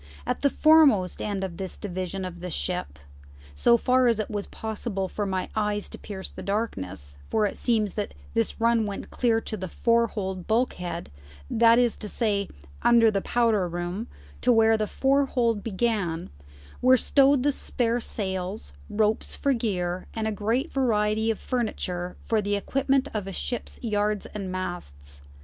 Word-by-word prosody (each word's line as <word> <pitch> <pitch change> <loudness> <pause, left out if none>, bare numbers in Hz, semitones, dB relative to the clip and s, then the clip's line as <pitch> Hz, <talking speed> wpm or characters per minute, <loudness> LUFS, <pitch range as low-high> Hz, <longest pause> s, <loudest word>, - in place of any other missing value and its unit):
At - - -2
the 280 - +4
foremost 285 - +5
end 200 -2 -2
of 175 -3 -5
this 190 -1 -5
division 185 -1 -4
of 175 -1 -7
the 180 +1 -5
ship, 70 - -3 0.6
so 235 - +4
far 255 +2 +3
as 230 -2 +3
it 215 0 -3
was 205 -1 -3
possible 215 -3 -4
for 205 +2 -3
my 190 -1 -1
eyes 210 -1 -1
to - - -10
pierce 190 -2 -7
the - - -9
darkness 95 - -3
for 215 - +2
it 205 - -2
seems 215 -5 +1
that 205 -1 -4 0.2
this 230 0 0
run 230 -1 +3
went 200 - -6
clear 230 -2 +2
to 220 - -5
the 190 -2 -5
fore 235 +5 +2
hold 190 -4 -4
bulkhead, 180 - -1 0.4
that 230 0 +6
is 240 -2 +3
to 210 - -7
say, 205 -4 0 0.3
under 230 -2 +5
the 200 -2 0
powder 225 -6 +2
room, 175 +6 -4 0.3
to 250 - +4
where 225 -1 +5
the 215 -1 -1
fore 275 +4 +2
hold 230 -5 +1
began 200 -6 -1 0.5
were 255 +1 +6
stowed 275 +1 +4
the 290 - +3
spare 240 -3 -1
sails, 185 - -4 0.2
ropes 215 0 0
for 280 - +1
gear, 185 -7 -2
and 220 -1 -1
a - - 0
great 225 - -1
variety 220 -4 +1
of 225 - 0
furniture 180 -7 -3
for 220 -2 +2
the 205 0 0
equipment 270 +5 +1
of 210 -3 -3
a - - -4
ship's 240 +5 -4
yards 210 -2 0
and 195 -3 -6
masts. 70 - -6
210 Hz, 170 wpm, -26 LUFS, 190-235 Hz, 0.6 s, that